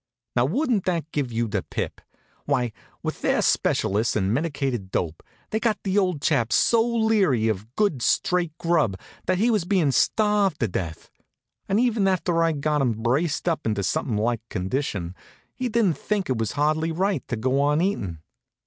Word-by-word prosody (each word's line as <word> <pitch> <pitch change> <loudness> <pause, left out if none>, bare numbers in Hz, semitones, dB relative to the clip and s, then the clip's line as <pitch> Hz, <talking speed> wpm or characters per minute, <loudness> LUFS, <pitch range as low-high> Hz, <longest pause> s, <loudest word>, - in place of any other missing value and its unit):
Now, 120 - +3
wouldn't 235 - 0
that 165 -3 -1
give 140 -5 -2
you 115 0 0
the 100 -2 -1
pip? - - -5 0.4
Why, 120 -2 0 0.3
with - - -4
their - - +2
specialists 105 +4 +1
and 100 -1 +1
medicated 135 - -2
dope, 85 -3 -2 0.3
they'd 220 - 0
got 225 -3 +1
the 195 +1 +2
old 180 -7 -1
chap 120 -7 +2
so 230 -1 +4
leery 220 - +2
of 110 +3 -3
good 200 - +1
straight 175 +4 +1
grub 155 - +1 0.3
that 185 0 +2
he 230 +5 +3
was 210 -5 +2
bein' 175 -6 +2
starved 210 +5 +2
to 115 - +2
death. 85 -4 -5 0.6
And 195 +3 +3
even 230 -5 +2
after 175 -2 +1
I'd 160 -4 0
got 150 0 +1
him 125 -4 +2
braced 145 +8 0
up 165 -2 0
into 105 -2 0
something 125 - -1
like 115 +2 0
condition, 95 -3 -2 0.4
he 255 -1 -3
didn't 210 - +1
think 200 -8 -1
it 125 - 0
was 110 -2 -1
hardly 155 +2 +1
right 190 +4 0
to 125 - -2
go 130 +5 +1
on 145 +2 +2
eatin'. 100 - -1
150 Hz, 175 wpm, -24 LUFS, 115-190 Hz, 0.6 s, so